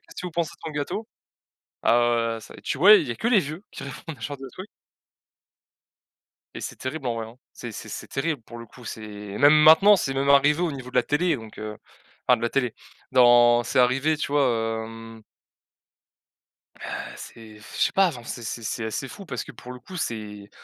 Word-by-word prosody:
qu'est-ce - - -11
que - - -4
vous 175 - -7
pensez 165 -1 -1
de - - -39
son 155 - -5
gâteau?» 150 +9 -3 0.8
alors, 120 0 +4 0.3
heu, - - -12
c - - -13
tu - - -3
ouais, 205 +6 +8
il 145 - -7
y - - -2
a - - -10
que 230 - -1
les 235 -5 +5
vieux 155 +4 -6
qui - - -8
répondent 140 +3 -8
à - - -21
ce 115 - -3
genre 145 -1 -7
de 135 0 -8
trucs 185 - -9 1.9
et - - -6
c'est - - -6
terrible, 135 +1 -5
en 120 - -1
vrai, 115 -1 -4
hein. 115 +2 -14 0.2
C'est 120 - -8
c'est - - -8
c'est - - -7
terrible, 145 0 -2
pour 120 +1 -11
le 115 - -9
coup, 125 +2 -16
c'est 110 - -6 0.4
même 145 +2 +7
maintenant, 160 +7 +7
c'est 135 -7 -2
même 135 +1 0
arrivé 145 +3 +5
au 175 - +1
niveau 130 -2 -8
de - - -20
la 125 - +5
télé, 165 +7 +1
donc, 110 -3 -12
heu, 105 0 -6 0.5
enfin 125 - +6
de 115 - -10
la 120 - +1
télé, 125 -4 0 0.4
non, 120 -1 +6
c'est 120 - +2
arrivé, 135 +5 +2
tu 150 - -4
vois, 115 -5 +1
hem 115 0 -11 1.6
ah - - -6
c'est 110 -2 -12
je 105 - -17
sais - - -1
pas, 195 -1 +4
enfin, 125 -8 -8
c'est 120 - -6
c'est 115 +1 -5
c'est 110 +1 -3
assez 110 +5 -3
fou 200 +8 -10
parce 125 -6 -4
que, - - -11
pour 125 - -10
le 125 - -9
coup, 180 +9 -11
c'est 105 - -5
125 Hz, 225 wpm, -25 LUFS, 115-155 Hz, 1.9 s, ouais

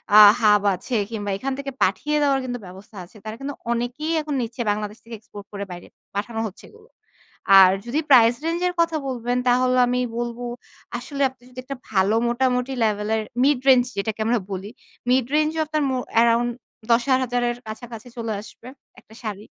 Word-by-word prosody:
আ - - +11 0.2
hub 210 -1 +5
আছে 210 +7 -5 0.2
কিংবা 205 -2 -4
এখান 270 +4 -3
থেকে 275 0 -4
পাঠিয়ে 295 +11 0
দেওয়ার 275 -2 +3
কিন্তু 245 -1 -4
ব্যবস্থা 190 +4 -13
আছে। 210 - -18
তারা 215 0 -5
কিন্তু 280 +1 -5 0.2
অনেকেই 245 +7 -2
এখন 300 -1 -4
নিচ্ছে 235 +1 -4
বাংলাদেশ 210 +1 -4
থেকে 230 0 -8
এক্সপোর্ট 205 -1 -12
করে 200 0 -4
বাইরে 175 0 -9 0.3
পাঠানো 210 +3 -3
হচ্ছে 200 - -13
এগুলো। 445 +1 -20 0.7
আর 185 -1 +8
যদি 270 +6 -1
প্রাইস 240 -3 +7
রেঞ্জ 335 +1 0
এর 355 - -2
কথা 330 -1 +1
বলবেন 245 -1 -2
তাহলে 255 +1 +3
আমি 250 0 0 0.2
বলব 240 0 -3 0.6
আসলে 280 +3 -6
আপনি 255 -1 -25
যদি 255 0 -10
একটা 275 0 -6
ভালো 195 +2 +2
মোটামুটি 250 +1 0
লেভেলের 215 0 0 0.2
মিড 280 -2 +3
রেঞ্জ 255 -2 +7
যেটাকে 215 +2 -2
আমরা 235 +1 +2
বলি, 195 +1 -5 0.4
মিড 255 -1 +3
রেঞ্জ 305 0 +3
ও - - +3
আপনার 305 0 -1
মো 260 - 0 0.2
আরাউন্ড 235 +1 +3 0.4
10,000 245 0 +2
এর 240 - -3
কাছাকাছি 225 +1 -8
চলে 225 -2 -3
আসবে, 230 +2 -14 0.3
একটা 220 - -20
শাড়ি। 210 -1 -5
240 Hz, 180 wpm, -23 LUFS, 215-260 Hz, 0.7 s, আ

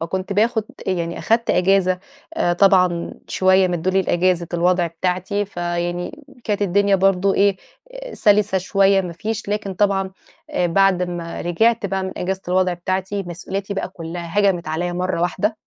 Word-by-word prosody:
فكنت 185 +4 -3
باخد 220 +2 +1 0.2
أ - - +2
يعني 170 -2 -2
أخدت 230 +1 +1
إجازة 185 0 +2 0.4
آآ 250 - +1
طبعًا 180 -2 +3
شويّة 190 0 +3
مدّولي 180 +2 0
إجازة 175 0 +1
الوضع 175 0 +2
بتاعتي، 185 +4 -2
فيعني 175 - -4 0.2
كانت 205 -1 -1
الدنيا 200 +1 +3
برضو 195 0 +2
إيه، 200 -1 +3 0.4
آآ - - -8
سلسة 205 -2 +3
شويّة 195 +1 +3
ما 180 -2 -5
فيش، 215 +4 -4
لكن 205 -2 -2
طبعًا 195 -1 +1 0.4
آآ 180 - +1
بعد 190 +1 +3
ما 175 -1 -5
رجعت 220 +5 +1
بقى 195 0 -2
من 190 0 -4
إجازة 190 +1 -2
الوضع 185 0 +2
بتاعتي 185 +3 -3
مسؤولياتي 195 +3 -5
بقى 195 - -3
كلّها 170 0 -6
هجمت 195 -4 +2
عليَّ 175 +2 -2
مرّة 180 0 -2
واحدة. 205 +5 0
185 Hz, 155 wpm, -20 LUFS, 175-200 Hz, 0.4 s, طبعًا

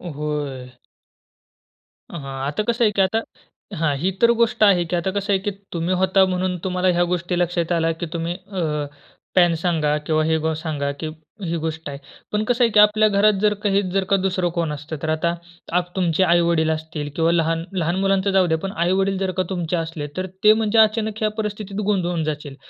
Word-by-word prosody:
होय. 140 -4 -4 1.3
हां. 170 - -6 0.3
आता 150 +9 -1
कसं 235 +2 0
आहे, 210 - +3
की 195 - +3
आता 190 +4 +2 0.6
हां, 155 -3 +1
ही 180 +7 0
तर 235 0 +6
गोष्ट 235 -1 +2
आहे 190 -4 +5
की - - +2
आता 175 +2 -1
कसं 200 +1 -1
आहे, 190 - +2
की 205 +2 -2 0.2
तुम्ही 170 +2 -1
होता 190 +1 +4
म्हणून 185 0 -1
तुम्हाला 185 0 0
ह्या 175 - +4
गोष्टी 175 0 -2
लक्षात 175 -1 0
आल्या, 165 -1 +2
की 165 +1 -4
तुम्ही 170 0 -2
अ, 190 0 -6 0.7
पॅन 175 -2 +5
सांगा 160 -3 0
किंवा 155 0 +1
हे 160 0 +2
बो 160 - +1
सांगा, 145 -3 -2
की 140 +3 -6 0.4
ही 170 0 -2
गोष्ट 160 -1 -4
आहे. 140 - -6 0.3
पण 210 0 0
कसं 245 +2 +1
आहे, 230 - +3
की 210 - +4
आपल्या 210 +1 +6
घरात 205 +1 +4
जर 210 0 +3
काही 200 -1 +2
जर 195 +1 +1
का - - +6
दुसरं 185 -2 0
कोण 165 -2 0
असतं. 150 +2 -6
तर 160 - -1
आता 160 +2 +1 0.5
आप 175 0 -8
तुमचे 180 -1 +2
आई-वडील 170 -2 +3
असतील 155 -1 -4
किंवा 165 0 +2
लहान 165 -1 +1
लहान 170 0 0
मुलांचं 195 0 +2
जाऊ 190 -2 +3
द्या, 160 -1 +1
पण 195 +4 -5
आई-वडील 190 +2 +1
जर 190 -1 -1
का - - +3
तुमचे 175 -2 -2
असले, 160 -2 -4
तर 185 - -1 0.2
ते 215 0 +8
म्हणजे 220 0 +2
अचानक 220 0 +2
ह्या 215 - +2
परिस्थितीत 210 -1 -4
गोंधळून 175 -5 0
जातील. 150 -2 -4
175 Hz, 205 wpm, -22 LUFS, 160-195 Hz, 1.3 s, ते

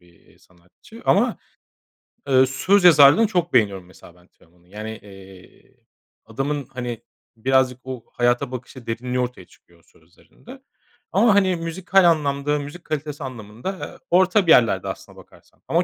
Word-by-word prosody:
bir, 90 -1 -24
eee, - - -26
sanatçı 90 - -19
ama, - - +2 0.9
ııı, 130 -1 +5
söz 185 +9 +1
yazarlığını 160 +5 +7
çok 175 -4 -2
beğeniyorum 100 -6 +1
mesela 90 -1 -17
ben 90 0 -24
Teoman'ın. 85 0 -28
Yani, 105 +3 -7
eee, 95 -2 -17 0.5
adamın, 135 +5 -3
hani, 120 -2 -6 0.3
birazcık 130 +1 +1
o 130 -3 -7
hayata 120 +2 0
bakışı, 125 -1 -9
derinliği 125 +2 -3
ortaya 125 -7 -4
çıkıyor 85 -1 -25
o - - -29
sözlerinde 225 - -18 0.5
ama, 225 -4 +3
hani 190 -2 +3
müzikal 175 +3 +1
anlamda, 145 -1 -1
müzik 145 +5 -9
kalitesi 150 -1 -5
anlamında, 115 - -7
aaa, 185 -7 -8
orta 185 +1 +3
bir - - +5
yerlerde 100 -9 +4
aslına - - -8
bakarsan - - -20
ama 170 +2 +1
130 Hz, 150 wpm, -21 LUFS, 110-165 Hz, 0.9 s, yazarlığını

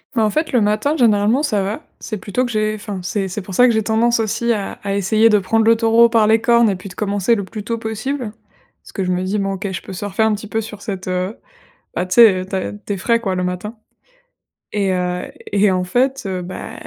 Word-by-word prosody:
Ben, 225 - +3
en 215 - +3
fait, 310 +9 -1
le 245 - +3
matin, 215 +9 +1
généralement, 220 0 +3
ça 210 -9 +1
va. 200 +3 -3 0.2
C'est 215 - -4
plutôt 210 +6 -2
que 240 - -4
j'ai 215 0 0
enfin, 205 -2 -6
c'est 195 +2 -2
c'est 195 +3 -4
pour 190 0 -9
ça 250 - +6
que 245 - +5
j'ai 220 - +2
tendance 230 +2 +2
aussi 230 +2 0
à 205 -3 -2
à 200 0 -2
essayer 215 +3 +3
de 210 -2 +4
prendre 220 +4 +1
le 230 0 +5
taureau 230 +1 +5
par 225 -2 +3
les 220 0 +4
cornes 235 -1 +4
et 195 - 0
puis 185 +2 -9
de 180 - -12
commencer 205 +2 +1
le 200 -3 -3
plus 210 +1 -7
tôt 230 +2 -2
possible 225 +1 -4 0.5
parce - - -15
que 195 - -3
je 180 - 0
me 180 +1 0
dis: 195 +3 -1
«Bon, 195 0 -1
OK, 195 0 -4
je 185 - -4
peux - - -9
surfer 205 +3 -1
un 220 -1 +3
petit 215 +1 -5
peu 220 +2 -2
sur 210 -2 -7
cette», 190 -3 -5
heu, 185 +3 -2 0.6
bah, 180 - -1
tu 180 - -2
sais, 215 -6 +7
heu, - - -8
tu 195 - -7
as 190 - -2
tu 205 0 -6
es - - -1
frais, 230 +4 +1
quoi, 190 -5 -2
le 180 - -1
matin 180 +5 -4 1.0
et 195 -2 0
heu 180 0 -1 0.3
et 200 0 +4
en 185 -1 0
fait, 260 +6 0
heu, 185 -1 -3
bah, 185 +1 -7
210 Hz, 265 wpm, -19 LUFS, 190-225 Hz, 1.0 s, sais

